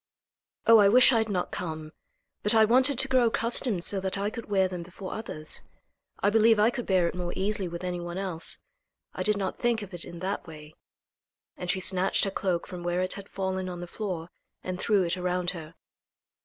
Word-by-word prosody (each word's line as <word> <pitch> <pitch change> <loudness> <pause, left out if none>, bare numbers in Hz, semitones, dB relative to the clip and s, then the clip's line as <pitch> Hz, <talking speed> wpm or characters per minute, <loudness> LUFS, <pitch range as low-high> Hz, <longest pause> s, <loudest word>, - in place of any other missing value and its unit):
"Oh! 225 -1 +8
I 200 -1 +6
wish 250 +4 +6
I 230 - +4
had 220 0 -1
not 180 -3 -2
come. 155 -3 -5 0.5
But 210 +2 +4
I 220 -1 +6
wanted 255 +4 +4
to 265 - +5
grow 255 -3 +3
accustomed 230 -4 +1
so 195 - -1
that 190 +1 -2
I 200 +1 -1
could 230 -1 -8
wear 190 -2 +3
them 180 -1 -6
before 185 +2 -8
others. 155 -8 -6 0.6
I 205 - +4
believe 225 +1 +5
I 215 +3 +4
could 245 -1 -5
bear 185 -3 +3
it - - -3
more 180 -1 -4
easily 195 0 -1
with 170 +1 -7
any 180 -1 -3
one 175 +1 -6
else. 185 -4 +2 0.6
I - - -5
did 210 -1 +2
not 195 -2 -3
think 235 -3 0
of 195 -1 -11
it 175 - -5
in 175 - -9
that 190 +2 -4
way," 155 -1 -11 0.8
and 180 - -6
she 190 - +2
snatched 185 0 +2
her 195 - 0
cloak 185 -3 -1
from 180 -1 -8
where 175 +1 -1
it 185 - 0
had 200 -1 -10
fallen 190 -1 -3
on 175 -1 -6
the 175 - -5
floor 175 -3 -5 0.3
and 185 0 -4
threw 205 -2 +2
it 175 +1 -1
around 180 0 0
her. 165 -3 -9
190 Hz, 220 wpm, -27 LUFS, 175-210 Hz, 0.8 s, Oh